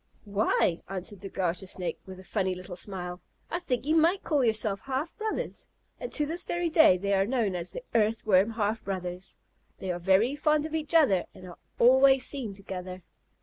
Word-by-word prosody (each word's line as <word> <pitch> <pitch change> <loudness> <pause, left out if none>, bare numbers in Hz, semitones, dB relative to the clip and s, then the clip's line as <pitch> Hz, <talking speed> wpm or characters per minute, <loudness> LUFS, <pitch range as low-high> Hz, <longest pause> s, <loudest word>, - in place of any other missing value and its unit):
"Why," 200 -4 +1
answered 195 +1 -3
the 195 +1 -7
Garter 185 0 -2
Snake, 185 -1 -4
with 185 -1 -9
a - - -11
funny 190 -1 -1
little 180 0 -8
smile, 180 -2 -5 0.3
"I 345 - -1
think 250 -7 -2
you 310 +2 +2
might 335 +5 +3
call 295 -4 +1
yourselves 215 -3 +1
half 275 +4 -3
brothers." 435 0 -4 0.3
And - - -6
to 300 - +1
this 330 +4 -2
day 325 - +4
they 200 +2 -1
are 195 0 +2
known 230 -6 0
as 175 0 -3
"the - - -7
Earthworm 215 -3 +3
half 220 -1 -2
brothers." 185 -1 -5 0.4
They 190 - -3
are 175 - -3
very 195 +9 +3
fond 300 0 +2
of 315 - -6
each 315 0 -2
other 230 - +4
and 185 - -12
are 175 - -12 0.2
always 265 +2 +6
seen 240 -9 -3
together. 185 -2 -7
210 Hz, 190 wpm, -28 LUFS, 185-280 Hz, 0.4 s, always